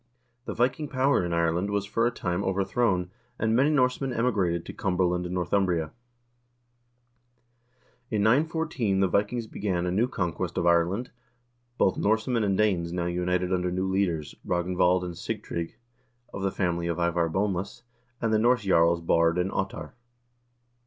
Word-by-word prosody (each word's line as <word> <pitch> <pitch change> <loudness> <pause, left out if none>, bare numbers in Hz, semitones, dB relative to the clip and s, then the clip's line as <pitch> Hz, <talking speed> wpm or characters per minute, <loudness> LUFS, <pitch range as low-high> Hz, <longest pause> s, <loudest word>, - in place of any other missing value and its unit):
The - - -5
Viking 130 +6 0
power 135 -5 +2
in 85 - -3
Ireland 85 +3 +1
was 100 -1 -1
for 115 +3 +1
a - - 0
time 90 -6 -2
overthrown, 95 -1 0 0.3
and 110 0 +1
many 135 +5 +4
Norsemen 130 -2 +1
emigrated 100 -9 0
to - - -7
Cumberland 90 -2 0
and 90 - -4
Northumbria. 90 -3 0 2.2
In 105 -3 0
914 140 -4 +1
the 95 - +4
Vikings 105 +5 0
began 95 -5 -2
a 90 - -1
new 110 +7 +2
conquest 90 -9 -3
of - - 0
Ireland; 85 +7 +2 0.7
both 95 - +2
Norse 110 +3 +1
men 120 -3 +1
and 100 -2 +1
Danes 90 -6 +1
now 85 0 -2
united 90 +1 0
under 90 0 0
new 95 +1 -1
leaders, 95 -6 -1
Ragnvald 90 +1 +1
and 90 -1 -5
Sig - - -5
trygg, 85 -1 -4 0.6
of 95 - -5
the 95 - +1
family 85 -3 -1
of 85 -2 -2
Ivar 85 -1 +1
Boneless, 100 +4 -2 0.4
and 115 -2 0
the 110 - +4
Norse 120 0 +3
jarls 85 -3 +3
Baard 85 0 +2
and 90 +2 0
Ottar. 95 0 -4
95 Hz, 160 wpm, -27 LUFS, 85-110 Hz, 2.2 s, many